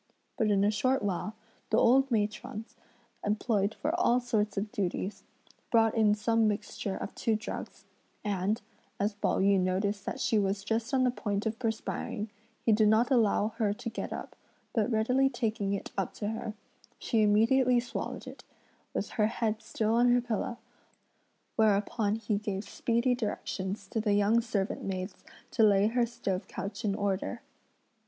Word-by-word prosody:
But 220 - +1
in 200 -1 +3
a 205 - +4
short 255 +5 +1
while, 205 +2 -2 0.3
the 220 - +3
old 270 +4 +5
matrons 215 0 -2 0.5
employed 210 0 +1
for 310 - -1
all 250 -8 +4
sorts 215 -4 -1
of 205 +1 -2
duties, 195 +1 -2 0.5
brought 225 -2 +4
in 215 -2 +4
some 225 +1 +2
mixture 205 -1 -2
of - - -5
two 225 - 0
drugs; 220 +1 -6 0.4
and, 205 +1 0 0.4
as 205 +2 +1
Pao 205 - 0
yü 195 0 +4
noticed 195 +2 0
that - - -3
she 220 - +2
was 195 0 0
just 225 +2 -1
on 265 -2 +3
the 250 - +3
point 205 -3 -2
of 220 0 -2
perspiring, 220 -2 -3 0.3
he 225 - +5
did 215 0 +5
not 220 +5 +4
allow 220 -4 +3
her 210 -4 +2
to 230 +3 -5
get - - -4
up, - - -6 0.4
but 220 0 +1
readily 250 +4 +3
taking 215 -6 -1
it 200 - -4
up 195 -3 -2
to 205 - -3
her, 225 -1 -4 0.4
she 225 - +1
immediately 240 +4 +4
swallowed 240 0 -5
it, - - -10 0.5
with - - -1
her 210 - +5
head 220 -1 -1
still 220 -1 -1
on 240 +1 +5
her 245 0 +5
pillow; 235 0 -2 1.0
whereupon 210 0 +2
he 215 -2 -1
gave 205 -1 -3
speedy 235 +2 +1
directions 200 -4 -3
to 220 - -1
the 210 -2 +2
young 205 +3 +4
servant 210 -4 -2
maids 185 0 -4 0.3
to 230 - +1
lay 205 -2 +6
her 235 +2 +2
stove 205 -6 -3
couch 200 +3 -5
in 200 -2 +1
order. 200 +4 -2
215 Hz, 165 wpm, -30 LUFS, 205-230 Hz, 1.0 s, lay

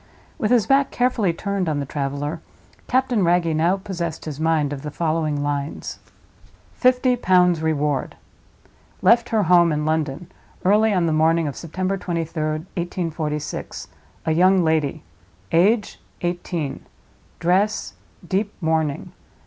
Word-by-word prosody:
With 215 - 0
his 235 -4 +4
back 275 +3 +3
carefully 245 -7 +1
turned 195 0 -2
on 150 -2 -1
the 140 - -2
traveler, 145 +3 -3 0.5
Captain 250 -4 +2
Wragge 170 -2 +2
now 170 +5 +2
possessed 175 -5 -5
his 150 -2 -6
mind 155 -3 +1
of 135 - -6
the 150 - -5
following 155 -2 -1
lines: 145 0 -3 0.7
"FIFTY 250 0 +3
POUNDS 180 -6 +3
REWARD." 150 -3 -1 0.9
"Left 235 0 +5
her 220 -3 +2
home, 175 -1 +5
in 150 0 -1
London, 155 +2 -2 0.3
early 215 +3 +4
on 180 -4 +2
the 160 - +1
morning 160 +1 +3
of 140 - -4
September 185 +4 -3
23d, 170 -2 -3 0.4
1846, 160 -4 -4 0.4
A 160 - +1
YOUNG 185 +3 +4
LADY. 160 - 0 0.5
Age—eighteen. 175 - -1 0.6
Dress—deep 195 +1 -1
mourning. 160 -4 -1
170 Hz, 125 wpm, -22 LUFS, 155-195 Hz, 0.9 s, Left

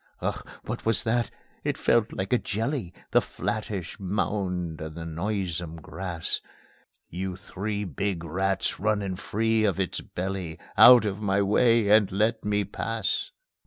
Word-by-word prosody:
Ugh! - - -2 0.2
What - - -4
was 115 0 +2
that? 115 0 +1 0.3
It - - -1
felt 115 -1 +3
like 95 +5 -2
a 125 - +4
jelly, 115 - -2 0.2
That - - +5
flattish 105 -5 -4
mound 90 -4 -2
in 80 0 -6
the 85 -1 -6
noisome 85 -1 -2
grass; 85 +1 -3 0.7
You 95 +1 -3
three 100 +2 -4
big 90 +1 -2
rats 95 +4 -1
running 100 -2 0
free 110 +3 +1
of 100 -3 +1
its 95 - -1
belly, 90 -3 -4 0.2
Out 120 -2 +9
of 105 0 -2
my 100 -1 +2
way 115 +2 +4
and 105 -2 +5
let 110 +4 +1
me 105 0 +1
pass! 110 - -2
100 Hz, 145 wpm, -27 LUFS, 90-110 Hz, 0.7 s, Out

